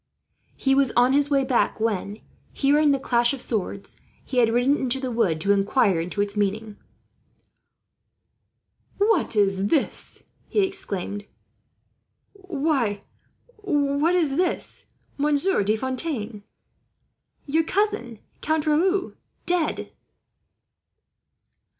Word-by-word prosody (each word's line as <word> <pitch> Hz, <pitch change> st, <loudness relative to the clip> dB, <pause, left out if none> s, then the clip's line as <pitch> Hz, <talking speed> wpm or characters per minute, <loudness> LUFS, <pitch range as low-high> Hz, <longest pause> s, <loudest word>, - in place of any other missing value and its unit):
He 270 Hz, -, +1 dB
was 275 Hz, -2 st, +3 dB
on 245 Hz, +2 st, +4 dB
his 285 Hz, 0 st, +2 dB
way 275 Hz, -2 st, +3 dB
back 255 Hz, -3 st, +1 dB
when, 210 Hz, -1 st, -2 dB, 0.3 s
hearing 295 Hz, +2 st, +3 dB
the 280 Hz, -, +3 dB
clash 240 Hz, -1 st, +1 dB
of -, -, -11 dB
swords, 200 Hz, -4 st, -4 dB, 0.3 s
he 260 Hz, -, -5 dB
had 230 Hz, -2 st, +4 dB
ridden 245 Hz, +4 st, +3 dB
into 260 Hz, 0 st, -1 dB
the 260 Hz, -2 st, -3 dB
wood 210 Hz, -9 st, +1 dB
to 200 Hz, -, +2 dB
inquire 200 Hz, -2 st, +2 dB
into 180 Hz, +4 st, -3 dB
its 205 Hz, 0 st, -1 dB
meaning. 210 Hz, +1 st, -1 dB, 2.2 s
"What 415 Hz, -, +2 dB
is 195 Hz, -1 st, +2 dB
this?" 285 Hz, +4 st, -1 dB, 0.3 s
he 415 Hz, -, +2 dB
exclaimed. 205 Hz, -, -3 dB, 1.1 s
"Why, 295 Hz, -, -1 dB, 0.6 s
what 300 Hz, -4 st, +1 dB
is 305 Hz, -6 st, +1 dB
this, 360 Hz, -1 st, -2 dB, 0.3 s
Monsieur 295 Hz, -, +2 dB
De 210 Hz, +2 st, +1 dB
Fontaine? 245 Hz, -4 st, -2 dB, 1.0 s
Your 315 Hz, +3 st, +1 dB
cousin, 395 Hz, -, -1 dB, 0.2 s
Count 315 Hz, 0 st, 0 dB
Raoul, 370 Hz, +5 st, +1 dB, 0.3 s
dead!" 350 Hz, -3 st, -1 dB
265 Hz, 110 wpm, -24 LUFS, 210-310 Hz, 2.2 s, on